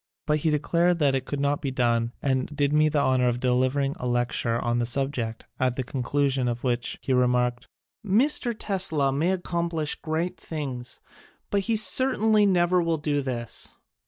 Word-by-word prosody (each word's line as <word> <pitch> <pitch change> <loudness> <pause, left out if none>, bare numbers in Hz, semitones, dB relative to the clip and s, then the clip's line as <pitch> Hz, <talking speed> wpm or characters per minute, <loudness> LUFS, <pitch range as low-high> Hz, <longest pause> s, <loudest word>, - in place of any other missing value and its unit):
But 150 0 +1
he 160 - 0
declared 170 +4 +1
that 145 -4 +2
it 130 -1 -1
could 145 - -4
not 140 +1 0
be 140 - -2
done 120 -2 0
and 130 -2 0
did 145 -1 -1
me 155 0 +4
the 150 -1 0
honor 130 -2 +2
of 120 0 0
delivering 130 +3 +1
a 125 - -3
lecture 120 -1 0
on 120 0 -1
the 120 - 0
subject, 125 -3 -2
at 130 -1 +1
the 130 - -2
conclusion 135 0 -1
of 120 0 -3
which 120 -2 -1
he 135 - 0
remarked: 125 -1 +1 0.4
"Mr. 235 +4 +2
Tesla 170 -10 0
may 160 +7 +1
ac 180 -1 -4
complish 170 -3 -2
great 165 +2 -3
things, 130 -7 -6 0.5
but 200 - +2
he 225 - +3
certainly 220 -2 +4
never 180 -1 +3
will 165 -1 0
do 150 -1 -1
this. 120 -4 -4
140 Hz, 180 wpm, -25 LUFS, 125-165 Hz, 0.5 s, me